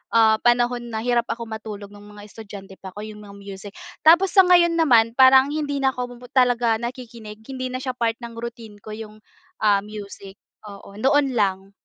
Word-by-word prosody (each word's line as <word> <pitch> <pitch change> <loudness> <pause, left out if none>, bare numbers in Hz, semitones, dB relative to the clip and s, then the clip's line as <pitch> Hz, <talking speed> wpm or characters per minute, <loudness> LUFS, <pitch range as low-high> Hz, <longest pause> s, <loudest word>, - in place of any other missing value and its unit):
ah, 220 -1 +5
panahon 240 0 +1
na 220 0 -4
hirap 240 -1 0
ako 235 - -4
matulog, 215 -2 -8
nung 205 0 -14
mga 210 0 -13
estudyante 200 -2 -12
pa 190 -1 -11
ko, 210 - -7
yung 215 -1 -9
mga 200 -1 -13
music. 200 0 -10 0.3
Tapos 345 +4 +5
sa 385 - +7
ngayon 350 -1 +5
naman, 235 -8 +4
parang 265 +2 +6
hindi 295 -2 -3
na 265 - +3
ko 250 -1 -5 0.2
talaga 245 -3 +2
nakikinig. 235 -3 -8
Hindi 255 +1 -5
na 255 - -4
siya 260 - -2
part 230 -2 -1
ng 235 0 -8
routine 230 -3 -9
ko 215 0 -8
yung 215 -1 -10 0.4
ah, 205 -2 +3
music. 200 -2 -10 0.3
Oo, 200 -1 -12
noon 270 +2 +2
lang. 195 -2 -1
225 Hz, 185 wpm, -22 LUFS, 205-250 Hz, 0.4 s, sa